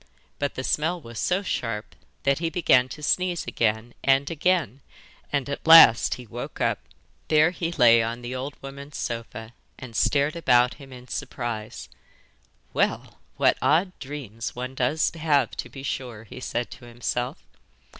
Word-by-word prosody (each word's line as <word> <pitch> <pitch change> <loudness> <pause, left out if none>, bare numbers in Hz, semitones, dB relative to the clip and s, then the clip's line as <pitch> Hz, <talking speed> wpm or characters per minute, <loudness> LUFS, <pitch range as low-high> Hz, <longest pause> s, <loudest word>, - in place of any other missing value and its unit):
But 145 -1 -2
the 130 - -4
smell 160 +6 0
was 115 -7 -9
so 185 +2 0
sharp 110 - -3 0.3
that 140 +1 +2
he 165 -1 -1
began 135 -7 +3
to 150 +4 -9
sneeze 180 +2 0
again 110 +1 -1
and 135 +2 +3
again, 160 - 0 0.5
and 140 -2 0
at 140 +3 -5
last 160 -9 +8
he 125 - -11
woke 120 +2 -7
up! - - +1 0.5
There 155 +2 +4
he 170 -2 -3
lay 115 -7 +6
on 115 +2 -4
the 120 +1 -5
old 135 +3 -5
woman's 140 +1 -8
sofa 115 -1 -5 0.2
and 125 -3 -10
stared 140 - +2
about 125 -7 +3
him 135 -1 -12
in 125 0 -12
surprise. 115 -5 -5 0.9
'Well, - - -1 0.2
what - - +3
odd 175 +5 +3
dreams 130 -6 -6
one 125 +1 -5
does 135 +5 +1
have 150 -6 +1
to - - -5
be 135 - -10
sure!' 125 -5 -5
he 115 - -11
said 120 -1 -3
to - - -11
himself. 120 +1 -3
130 Hz, 160 wpm, -25 LUFS, 120-150 Hz, 0.9 s, last